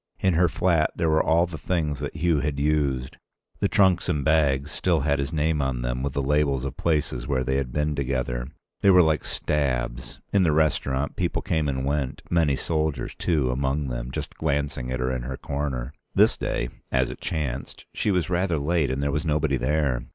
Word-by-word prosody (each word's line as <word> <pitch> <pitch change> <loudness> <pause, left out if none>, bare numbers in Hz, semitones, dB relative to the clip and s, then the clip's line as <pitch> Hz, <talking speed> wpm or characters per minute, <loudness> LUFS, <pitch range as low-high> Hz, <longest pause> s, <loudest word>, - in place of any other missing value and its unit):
In 95 -2 +2
her 85 +1 +3
flat 85 -2 +2
there 80 -1 +1
were 80 - +4
all 85 +2 +3
the 85 -3 -8
things 75 -4 -1
that 70 +1 -5
Hugh 80 -1 +2
had 70 0 -2
used; 70 -4 0 0.4
the - - +2
trunks 95 -3 +3
and 70 -2 0
bags 75 -3 +2
still 85 +1 +1
had 70 0 +1
his 70 +2 -2
name 80 -1 +1
on 65 -3 -1
them - - -2
with 70 0 -2
the 70 - -1
labels 70 -2 +1
of 70 - -4
places 70 -7 -1
where 65 -3 0
they 65 +1 0
had 65 -3 -2
been 75 +3 0
together. 65 -3 -2 0.3
They 100 - +5
were 90 -2 +7
like 80 -2 +1
stabs. 65 -4 -2
In 100 - +4
the 80 -4 +3
restaurant, 70 -3 +1
people - - -1
came 80 -3 0
and 65 -1 -2
went, 70 -2 -2
many 80 -5 +3
soldiers 80 -1 -1
too 75 -8 0
among 70 +2 -1
them, - - -4
just - - -5
glancing 70 -4 -2
at 65 - -2
her 65 +1 0
in 65 - -3
her 65 +2 -5
corner. 70 -2 -3 0.2
This - - +5
day, - - -2 0.2
as 65 -1 +1
it - - -10
chanced, 70 -5 -4
she - - -1
was 90 -5 +1
rather 90 -2 0
late 75 0 +1
and 65 +2 -1
there 70 - +1
was 75 +2 -1
nobody 75 -3 +1
there. 65 -1 0
70 Hz, 205 wpm, -25 LUFS, 65-80 Hz, 0.4 s, were